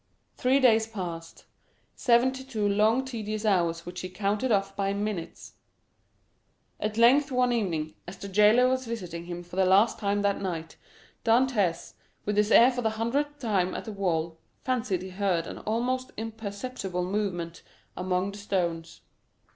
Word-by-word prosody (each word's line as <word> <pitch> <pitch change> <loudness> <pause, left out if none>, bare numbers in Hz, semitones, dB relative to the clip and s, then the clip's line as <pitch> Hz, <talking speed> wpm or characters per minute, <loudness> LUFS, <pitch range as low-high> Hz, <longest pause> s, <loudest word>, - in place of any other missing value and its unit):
Three 260 +2 +2
days 225 -4 +4
passed—seventy 225 +7 -2
two 220 -6 -1
long 215 +6 +3
tedious 215 -4 -4
hours 170 -5 +1
which 180 +1 -6
he 185 - -5
counted 205 +6 -1
off 195 -1 +1
by 195 0 0
minutes! 200 -4 -4 1.3
At 215 +1 -3
length 270 +5 +5
one 250 -1 +2
evening, 165 -9 -1
as 175 - -8
the 200 - -7
jailer 210 +5 +5
was 260 -1 -1
visiting 180 -7 -5
him 175 0 -6
for 175 +1 -11
the 190 - +4
last 200 +5 +4
time 205 -1 0
that 200 -1 +1
night, 165 -4 -4 0.5
Dantès, 225 -8 +2 0.3
with 210 - -1
his 210 0 +3
ear 240 +3 +7
for 245 -1 -3
the 225 - +1
hundredth 285 +6 -1
time 200 -8 0
at - - -5
the 220 - -5
wall, 165 -5 -2 0.2
fancied 235 -8 -1
he 190 - -7
heard 185 -3 0
an - - -7
almost 250 +4 -1
imperceptible 215 -3 -4
movement 180 -4 -3 0.3
among 185 +1 -1
the 205 - -10
stones. 170 -5 -2
205 Hz, 155 wpm, -27 LUFS, 180-235 Hz, 1.3 s, ear